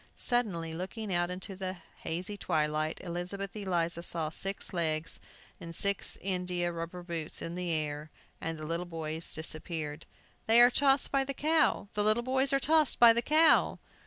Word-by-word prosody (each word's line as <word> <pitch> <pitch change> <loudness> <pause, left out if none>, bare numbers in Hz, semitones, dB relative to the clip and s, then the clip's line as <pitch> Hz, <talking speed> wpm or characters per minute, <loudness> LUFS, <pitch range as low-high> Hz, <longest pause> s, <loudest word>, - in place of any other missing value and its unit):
Suddenly, 190 -10 0
looking 190 +4 -5
out 175 0 +1
into 185 +2 -5
the 185 0 -5 0.2
hazy 180 +5 -3
twilight, 155 -3 -1
Elizabeth 180 +3 -5
Eliza 175 -4 -1
saw 165 -2 -2
six 195 +4 -2
legs 160 -2 -2 0.4
and 165 0 -7
six 200 +2 0
india 180 -2 -1
rubber 170 +1 -6
boots 165 -3 -3
in 165 - -5
the 180 -1 -3
air, 150 -1 -2 0.3
and 165 0 -3
the 155 - -7
little 170 +3 -3
boys 160 -1 +1
disappeared! 155 -1 -4 0.4
"They 225 +1 +7
are 245 +1 +8
tossed 275 +1 +3
by 275 -1 +2
the 275 0 -5
cow! 310 -8 +2
The 210 -1 0
little 215 +3 +2
boys 265 +2 +2
are 275 - +3
tossed 310 0 +3
by 235 -1 +8
the 235 - +1
cow!" 310 +5 +4
180 Hz, 165 wpm, -30 LUFS, 165-220 Hz, 0.4 s, are